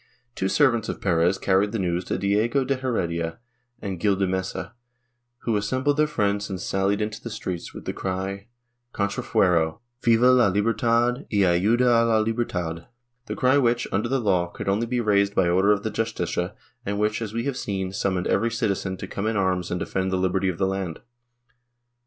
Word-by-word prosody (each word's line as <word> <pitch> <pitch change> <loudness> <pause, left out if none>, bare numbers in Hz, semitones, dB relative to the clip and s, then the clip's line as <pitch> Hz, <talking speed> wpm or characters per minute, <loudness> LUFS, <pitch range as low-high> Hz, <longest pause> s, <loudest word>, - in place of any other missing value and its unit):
Two 95 - -1
servants 120 -5 +2
of - - -4
Perez 90 0 +2
carried 100 +2 +1
the - - 0
news 90 -2 -1
to - - -2
Diego 110 +7 +1
de 135 - +1
Heredia 85 -11 -2 0.5
and 95 -3 -4
Gil 100 +2 +2
de 95 0 +1
Mesa, 95 +1 -3 0.7
who 115 - 0
assembled 130 +8 0
their 150 0 +3
friends 100 -7 -1
and 95 -2 -4
sallied 95 +2 0
into 105 +1 -3
the 115 - -6
streets, 90 -6 -5
with - - -10
the - - -2
cry, 95 +1 -4 0.5
Contrafuero! 90 -5 +1 0.2
Viva 120 +2 +5
la 125 -5 +5
lihertad 115 +5 +1
yayudaala 110 +4 +3
liber 115 +1 0
tad! 85 -4 -4 0.2
— 120 +1 -51
the - - -3
cry 130 +2 +3
which, 120 -1 +1
under 110 +5 0
the 135 +1 +1
law, 95 -6 +1
could 85 - -8
only 105 +4 +1
be 125 +1 -1
raised 100 -3 +2
by 95 - +3
order 95 +4 +3
of 105 -1 +1
the 110 - -2
Justicia 95 -6 -2 0.3
and 100 +1 -2
which, 105 +2 0
as 110 -3 -4
we 115 +1 -2
have 140 0 -2
seen, 95 -6 -3
summoned 95 -3 -1
every 115 - +2
citizen 100 -4 -1
to - - -6
come 100 +3 -3
in 110 -1 0
arms 90 -2 0
and 90 - -2
defend 95 +1 -2
the 95 - +1
liberty 95 +1 +1
of 90 - -3
the 95 - +1
land. 95 -3 -3
100 Hz, 190 wpm, -24 LUFS, 95-115 Hz, 0.7 s, Viva